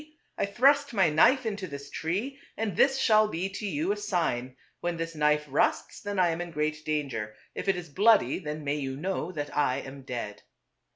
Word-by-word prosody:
I - - -1
thrust 280 +5 +3
my 185 -6 +4
knife 255 - +5
into 205 -3 -3
this 140 -1 -8
tree, 210 - -3 0.2
and 215 -5 -2
this 270 +5 +4
shall 215 -4 +4
be 190 -1 -3
to 205 +2 -5
you 165 +1 -1
a - - +1
sign: 145 -11 -1 0.2
when 175 -1 -2
this 165 0 -4
knife 150 -1 +2
rusts 140 +1 0
then 205 -1 -4
I 180 -2 +4
am 165 +1 -2
in 175 - -5
great 155 -1 -2
danger; 135 -9 -2 0.2
if - - -5
it 195 - +3
is 180 -1 -6
bloody 205 +8 +4
then 150 -3 -5
may 145 +1 -1
you 135 -2 -4
know 180 +1 -2
that 145 -4 -5
I 145 -3 +2
am 135 0 -8
dead." 120 -5 -6
165 Hz, 205 wpm, -28 LUFS, 145-200 Hz, 0.2 s, knife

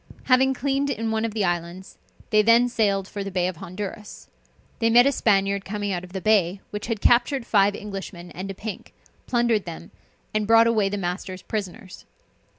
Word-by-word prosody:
Having 265 +1 +3
cleaned 275 +2 -1
in 225 -4 -2
one 220 0 0
of 225 -1 -4
the 210 -3 +1
islands, 175 +1 -4 0.3
they 215 -1 +5
then 230 +3 +5
sailed 200 -5 0
for 200 -1 -5
the 195 - -5
bay 180 -2 0
of 185 -3 -5
Honduras. 200 +4 -8 0.5
They 230 -1 +2
met 240 +2 +6
a 280 - +4
Spaniard 200 -5 +1
coming 205 0 -3
out 175 -1 -3
of 180 - -11
the 190 - -4
bay, 195 -2 +2
which 210 0 -5
had 225 -4 -3
captured 245 +1 +3
five 205 -2 +3
Englishmen 195 -4 -8
and 190 +2 -6
a 195 - -5
pink, 210 -1 -8 0.3
plundered 235 -4 +1
them, 170 -1 -9 0.4
and 215 -1 0
brought 225 +1 +6
away 220 -4 +2
the 205 - -3
masters 185 0 -4
prisoners. 200 -1 -6
205 Hz, 190 wpm, -24 LUFS, 190-230 Hz, 0.5 s, met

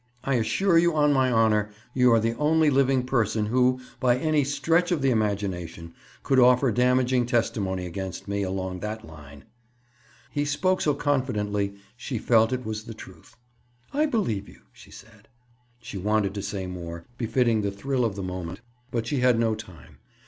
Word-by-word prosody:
I 135 - 0
assure 165 - +2
you, 170 -1 +2
on 150 -1 +4
my 130 -2 +2
honor, 110 -2 +2 0.2
you 125 -1 +4
are 115 - +5
the 115 +1 -1
only 155 0 +3
living 135 -1 +2
person 110 -4 0
who, 125 +3 +2 0.2
by 125 -1 +3
any 155 +1 +1
stretch 165 +6 +1
of 160 -6 0
the 135 - +3
imagination, 95 -6 -2 0.3
could 135 - +3
offer 125 +1 +5
damaging 125 +1 +2
testimony 100 -6 -1
against 95 +1 -6
me, 100 0 -2
along 95 -1 -3
that 110 +3 -5
line." 75 -3 -13 0.9
He 145 - -1
spoke 180 +6 0
so 150 -2 +1
confidently 105 -9 -1 0.2
she 125 0 -5
felt 115 0 +3
it 130 0 -3
was 110 0 -5
the 115 - -8
truth. 95 0 -14 0.6
"I 300 +2 +2
believe 115 - -1
you," - - -17
she - - -16
said. 110 -1 -16 0.6
She 105 -3 -6
wanted 105 0 0
to 100 - -4
say 100 -1 -4
more, 85 -2 -7
befitting 115 -1 +1
the 100 - -1
thrill 125 +6 -2
of 110 -4 -1
the 100 - -5
moment, 90 0 -5 0.3
but 115 -1 -2
she 140 +2 -1
had 125 -1 +4
no 115 -1 +2
time. 105 -6 -11
115 Hz, 175 wpm, -25 LUFS, 100-130 Hz, 0.9 s, are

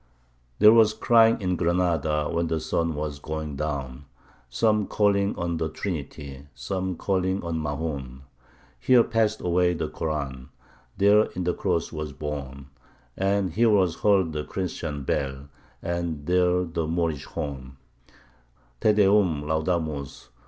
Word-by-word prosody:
There 105 +1 +8
was 110 -2 +5
crying 115 0 +4
in 90 -2 0
Granada 85 -4 +1
when 85 0 -1
the 80 0 -1
sun 80 +1 -1
was 75 -1 -4
going 75 -1 -5
down; 70 -2 -4 0.4
Some 105 - +1
calling 100 -1 +1
on 85 -1 -2
the 80 0 -2
Trinity 70 -6 -6
some 95 +9 -3
calling 95 +1 -1
on 85 -1 -2
Mahoun. 75 -4 -4 0.6
Here 125 -2 +5
passed 110 -2 0
away 90 0 +2
the - - -2
Koran 70 -5 -4 0.5
there 105 +2 +5
in 90 - -2
the 90 0 0
Cross 90 -4 -1
was 75 -2 -5
borne 70 -2 -6 0.4
And 95 -1 0
here 115 +2 +3
was 95 -5 +2
heard 95 -6 +3
the 75 0 -3
Christian 80 -6 -4
bell 70 +1 -3 0.3
and 85 -4 -3
there 90 +1 +2
the 85 -2 -3
Moorish 80 -4 -1
horn: 65 -2 -6 1.0
Te 105 - +4
Deum 100 -7 +3
Laudamus! 80 -4 -2
85 Hz, 135 wpm, -25 LUFS, 75-95 Hz, 1.0 s, There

